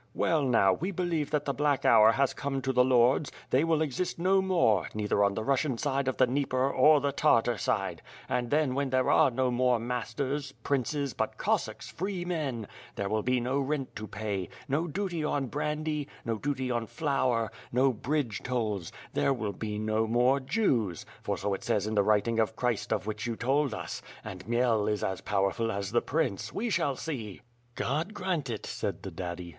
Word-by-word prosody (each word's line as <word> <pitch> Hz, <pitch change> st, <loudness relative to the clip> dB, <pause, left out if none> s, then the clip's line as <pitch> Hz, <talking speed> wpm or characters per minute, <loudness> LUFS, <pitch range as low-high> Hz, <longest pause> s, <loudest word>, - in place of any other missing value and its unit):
Well, 165 Hz, -2 st, +2 dB
now, 115 Hz, -8 st, +4 dB
we 175 Hz, -, -2 dB
believe 170 Hz, -5 st, -1 dB
that 150 Hz, -1 st, 0 dB
the 140 Hz, -, 0 dB
black 145 Hz, -1 st, +1 dB
hour 110 Hz, +1 st, +7 dB
has 135 Hz, 0 st, +2 dB
come 135 Hz, -1 st, -3 dB
to 135 Hz, -, 0 dB
the 125 Hz, 0 st, +5 dB
lords; 130 Hz, +3 st, +3 dB, 0.2 s
they 130 Hz, +4 st, +4 dB
will 160 Hz, -1 st, +2 dB
exist 155 Hz, +5 st, -2 dB
no 190 Hz, +3 st, +3 dB
more, 170 Hz, -, +2 dB
neither 105 Hz, -1 st, +1 dB
on 100 Hz, 0 st, +2 dB
the 110 Hz, -, -2 dB
Russian 135 Hz, 0 st, +1 dB
side 140 Hz, 0 st, -1 dB
of 130 Hz, -, -1 dB
the 130 Hz, -, +6 dB
Dnieper 130 Hz, 0 st, 0 dB
or 150 Hz, +3 st, +6 dB
the 140 Hz, 0 st, 0 dB
Tartar 120 Hz, -5 st, +3 dB
side; 100 Hz, -, -1 dB, 0.3 s
and 125 Hz, -2 st, -1 dB
then 150 Hz, -2 st, +2 dB
when 140 Hz, 0 st, 0 dB
there 130 Hz, 0 st, +2 dB
are -, -, +5 dB
no 130 Hz, +1 st, 0 dB
more 125 Hz, 0 st, +3 dB
masters, 135 Hz, +4 st, -3 dB
princes, 140 Hz, 0 st, -1 dB
but -, -, -2 dB
Cossacks, -, -, -1 dB
free 185 Hz, 0 st, -3 dB
men 145 Hz, -10 st, -2 dB, 0.2 s
— -, -, -20 dB
^there 100 Hz, 0 st, -2 dB
will 110 Hz, 0 st, +1 dB
be 125 Hz, +3 st, +1 dB
no 130 Hz, +3 st, 0 dB
rent 140 Hz, -1 st, -2 dB
to 110 Hz, 0 st, -6 dB
pay, 100 Hz, -3 st, -3 dB, 0.2 s
no 155 Hz, +5 st, 0 dB
duty 175 Hz, -1 st, -2 dB
on 145 Hz, -2 st, 0 dB
brandy, 150 Hz, +2 st, -2 dB, 0.2 s
no 115 Hz, -2 st, -1 dB
duty 130 Hz, -2 st, -2 dB
on 120 Hz, -2 st, -1 dB
flour, 130 Hz, -6 st, 0 dB, 0.2 s
no 130 Hz, +2 st, +3 dB
bridge 125 Hz, -2 st, -2 dB
tolls; 110 Hz, -8 st, -2 dB, 0.2 s
there -, -, +2 dB
will 110 Hz, -5 st, -3 dB
be 105 Hz, 0 st, -4 dB
no 110 Hz, +1 st, 0 dB
more 125 Hz, +4 st, +3 dB
Jews, 130 Hz, -, 0 dB, 0.2 s
for -, -, -2 dB
so 100 Hz, -, -1 dB
it 95 Hz, -, -4 dB
says 105 Hz, -1 st, +1 dB
in 110 Hz, -, -2 dB
the 105 Hz, -, +4 dB
writing 110 Hz, +3 st, +2 dB
of 110 Hz, 0 st, +1 dB
Christ 125 Hz, -4 st, -1 dB
of 100 Hz, -3 st, 0 dB
which 110 Hz, +2 st, -3 dB
you 115 Hz, -, -2 dB
told 135 Hz, +4 st, +1 dB
us. -, -, -5 dB, 0.2 s
And 95 Hz, +1 st, -8 dB
Khmel 120 Hz, -3 st, +2 dB
is 105 Hz, -, -2 dB
as 95 Hz, -1 st, -2 dB
powerful 105 Hz, +3 st, 0 dB
as 100 Hz, -1 st, -3 dB
the 120 Hz, -, +3 dB
prince; 120 Hz, -8 st, -1 dB
we 230 Hz, +2 st, -2 dB
shall 140 Hz, -6 st, +1 dB
see." 120 Hz, -10 st, -5 dB, 0.3 s
"God 160 Hz, +10 st, -2 dB
grant 180 Hz, -8 st, -2 dB
it," 110 Hz, -3 st, -4 dB
said -, -, -4 dB
the -, -, -6 dB
daddy. 90 Hz, -1 st, -5 dB
130 Hz, 200 wpm, -29 LUFS, 110-145 Hz, 0.3 s, hour